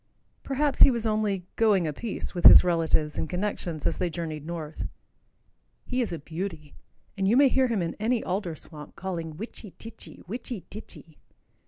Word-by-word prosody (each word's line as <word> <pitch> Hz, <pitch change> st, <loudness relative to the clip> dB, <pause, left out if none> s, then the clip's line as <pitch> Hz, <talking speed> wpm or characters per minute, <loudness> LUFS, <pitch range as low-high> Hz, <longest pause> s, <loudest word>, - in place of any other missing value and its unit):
Perhaps 280 Hz, +1 st, -1 dB
he -, -, +10 dB
was 235 Hz, -3 st, -1 dB
only 210 Hz, -4 st, 0 dB
"going 205 Hz, -6 st, +4 dB
a 155 Hz, -, -2 dB
piece" 225 Hz, +6 st, -5 dB
with 175 Hz, -2 st, -3 dB
his -, -, +11 dB
relatives 165 Hz, -3 st, +1 dB
and -, -, -2 dB
connections 180 Hz, -4 st, -3 dB
as -, -, 0 dB
they 180 Hz, -, 0 dB
journeyed 160 Hz, -3 st, -5 dB
north. 160 Hz, -2 st, -5 dB, 1.0 s
He 255 Hz, 0 st, -1 dB
is 235 Hz, -, -2 dB
a 170 Hz, -, -3 dB
beauty, 160 Hz, -1 st, -6 dB, 0.4 s
and 195 Hz, -2 st, 0 dB
you 225 Hz, +5 st, +4 dB
may 280 Hz, -1 st, +7 dB
hear 260 Hz, 0 st, +3 dB
him 220 Hz, -7 st, 0 dB
in 165 Hz, -, -3 dB
any 230 Hz, +2 st, +1 dB
alder 180 Hz, -3 st, -2 dB
swamp 150 Hz, -2 st, -12 dB
calling 165 Hz, -4 st, -5 dB
"witchy 215 Hz, -1 st, -9 dB
titchy, 225 Hz, -, -11 dB
witchy 230 Hz, 0 st, -6 dB
titchy." 170 Hz, -7 st, -11 dB
185 Hz, 175 wpm, -27 LUFS, 165-225 Hz, 1.0 s, his